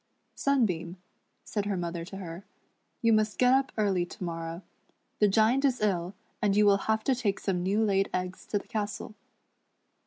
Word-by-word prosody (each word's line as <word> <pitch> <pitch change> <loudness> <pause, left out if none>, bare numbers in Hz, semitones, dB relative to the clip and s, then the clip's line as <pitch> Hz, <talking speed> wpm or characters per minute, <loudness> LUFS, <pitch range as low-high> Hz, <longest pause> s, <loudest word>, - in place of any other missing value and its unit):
".Sunbeam," 190 -11 0 0.5
.said 205 -2 -3
her 200 -2 -1
mother 170 -1 -3
to 195 +3 -8
her, 175 -1 -7 0.6
"you 230 -1 +5
must 215 -1 +2
get 250 0 +5
up 270 0 +2
early 195 -4 +2
to 175 - -8
morrow. 165 +1 -5 0.6
The 210 - +5
Giant 225 +6 +3
is 265 -3 +2
ill, 190 -3 0 0.3
and 205 -1 +2
you 210 - +5
will 200 -1 +6
have 220 0 +2
to 265 - +2
take 215 -6 -1
some 185 -3 -1
new 200 +5 +1
laid 195 -1 +2
eggs 185 0 -4
to 210 - 0
the 200 - -7
castle." 210 0 -4
200 Hz, 180 wpm, -29 LUFS, 180-220 Hz, 0.6 s, will